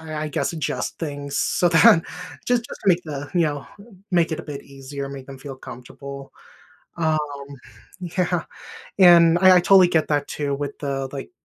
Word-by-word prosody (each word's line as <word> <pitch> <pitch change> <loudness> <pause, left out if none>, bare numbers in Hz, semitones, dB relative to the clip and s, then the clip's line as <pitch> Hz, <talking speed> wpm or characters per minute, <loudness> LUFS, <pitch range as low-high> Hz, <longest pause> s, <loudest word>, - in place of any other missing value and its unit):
I 160 -1 -8
I - - -3
guess 150 - -2
adjust 160 -3 -4
things 145 -3 -5
so 175 - +1
that 165 -1 +6 0.4
just 245 -1 +2
just - - -10
to - - -11
make 180 -1 +3
the, 145 -2 -6
you 175 - +3
know, 145 -3 -2 0.4
make 170 -2 +2
it 160 - -3
a - - -12
bit 145 -2 -7
easier, 140 0 -8
make 135 -1 -9
them 135 -1 -10
feel 135 0 -9
comfortable. 135 +2 -10 0.7
Um, 160 -2 +1 0.8
yeah, 180 -1 -1 0.6
and 170 -2 +7
I 185 0 +7
I - - +5
totally 185 0 +6
get 160 -3 +1
that 145 -1 0
too 145 -2 -3
with 145 0 -5
the, 135 -2 -3
like, 140 - -6
150 Hz, 185 wpm, -22 LUFS, 140-175 Hz, 0.8 s, and